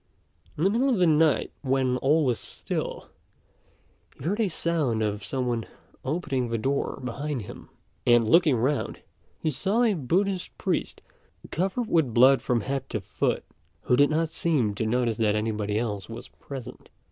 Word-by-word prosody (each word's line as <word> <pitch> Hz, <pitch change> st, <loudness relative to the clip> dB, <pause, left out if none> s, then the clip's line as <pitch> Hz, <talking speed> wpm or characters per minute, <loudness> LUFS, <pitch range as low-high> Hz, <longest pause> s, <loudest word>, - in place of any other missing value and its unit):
In 155 Hz, -, -1 dB
the 195 Hz, -, +4 dB
middle 250 Hz, +5 st, +2 dB
of 245 Hz, -, +2 dB
the 180 Hz, -, +4 dB
night, 155 Hz, -2 st, +3 dB
when 130 Hz, -2 st, +1 dB
all 150 Hz, +4 st, +3 dB
was 125 Hz, -3 st, +1 dB
still, -, -, -5 dB, 1.1 s
he -, -, -11 dB
heard 200 Hz, +6 st, 0 dB
a 210 Hz, -, +2 dB
sound 155 Hz, -10 st, 0 dB
of 105 Hz, -1 st, -2 dB
some 130 Hz, +2 st, -2 dB
one 120 Hz, -2 st, -2 dB, 0.4 s
opening 135 Hz, -5 st, -1 dB
the 115 Hz, -, 0 dB
door 135 Hz, +5 st, -1 dB
behind 130 Hz, +1 st, -3 dB
him; -, -, -11 dB, 0.3 s
and 120 Hz, -2 st, +4 dB
looking 160 Hz, +1 st, +5 dB
round, 135 Hz, +5 st, -1 dB, 0.4 s
he 155 Hz, -, -1 dB
saw 200 Hz, -, +1 dB
a 225 Hz, -3 st, +3 dB
Buddhist 185 Hz, +5 st, -1 dB
priest, -, -, -2 dB, 0.5 s
covered 195 Hz, +7 st, -1 dB
with 155 Hz, -, +1 dB
blood 130 Hz, +3 st, +6 dB
from 120 Hz, -2 st, 0 dB
head 135 Hz, +3 st, -3 dB
to 110 Hz, -, -2 dB
foot, 95 Hz, -, -1 dB, 0.4 s
who 125 Hz, -, +2 dB
did 145 Hz, +3 st, +5 dB
not 160 Hz, +1 st, +1 dB
seem 150 Hz, -10 st, +1 dB
to 110 Hz, +2 st, -2 dB
notice 120 Hz, -1 st, +1 dB
that 105 Hz, -2 st, +2 dB
anybody 105 Hz, -1 st, -1 dB
else 105 Hz, -4 st, -3 dB
was -, -, -8 dB
present. 135 Hz, -4 st, -10 dB
135 Hz, 170 wpm, -26 LUFS, 115-165 Hz, 1.1 s, blood